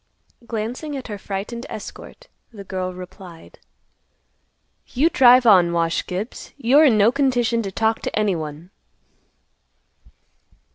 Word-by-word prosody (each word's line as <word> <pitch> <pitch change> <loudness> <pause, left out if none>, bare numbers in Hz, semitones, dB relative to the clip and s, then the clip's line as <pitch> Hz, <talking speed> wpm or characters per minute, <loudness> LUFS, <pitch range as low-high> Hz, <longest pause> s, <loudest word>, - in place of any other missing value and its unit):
Glancing 245 +7 -4
at 260 - -8
her 205 -1 -6
frightened 210 +6 -6
escort, - - -10 0.2
the 205 -4 -10
girl 185 -1 -4
replied, 180 -2 -12 1.3
"You 300 +7 +1
drive 250 -2 +6
on, 180 -6 +5
Wash 165 0 0
Gibbs. 195 +6 -6
You're 280 +4 +4
in 240 -7 +4
no 210 +3 +4
condition 245 -4 +1
to 195 -3 -5
talk 220 +3 0
to - - -4
anyone." 170 -5 -3
215 Hz, 115 wpm, -21 LUFS, 185-245 Hz, 1.3 s, drive